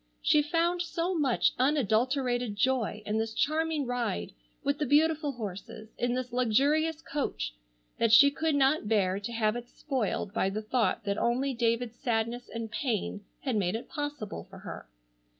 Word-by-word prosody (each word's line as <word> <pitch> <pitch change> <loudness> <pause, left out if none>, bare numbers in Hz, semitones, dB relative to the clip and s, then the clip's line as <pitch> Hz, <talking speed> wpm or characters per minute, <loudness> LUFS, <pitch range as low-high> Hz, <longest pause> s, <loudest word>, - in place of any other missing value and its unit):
She 300 - +5
found 335 +4 +1
so 345 +1 -1
much 285 -8 +2
unadulterated 250 -2 +1
joy 225 -2 0
in 215 +1 0
this 225 0 -2
charming 310 0 +1
ride 240 - -2 0.3
with 280 +1 0
the 300 - +1
beautiful 300 +1 +3
horses, 215 -1 -7
in 245 0 0
this 250 -1 -4
luxurious 290 +7 +2
coach, 280 - -3 0.5
that 230 -1 +3
she 280 +6 +8
could 315 +1 0
not 275 -3 +3
bear 195 -3 +2
to 205 +3 -5
have 220 -1 +1
it 240 0 -6
spoiled 240 -7 -2
by 195 - +1
the 215 +3 -4
thought 225 -1 0
that 200 0 -1
only 260 +3 +1
David's 235 0 0
sadness 235 -1 -1
and 230 -1 -5
pain 215 -5 -2 0.2
had 260 -4 -1
made 195 -1 +1
it 225 - -6
possible 290 -8 -5
for - - -11
her. - - -8
245 Hz, 165 wpm, -29 LUFS, 220-290 Hz, 0.5 s, she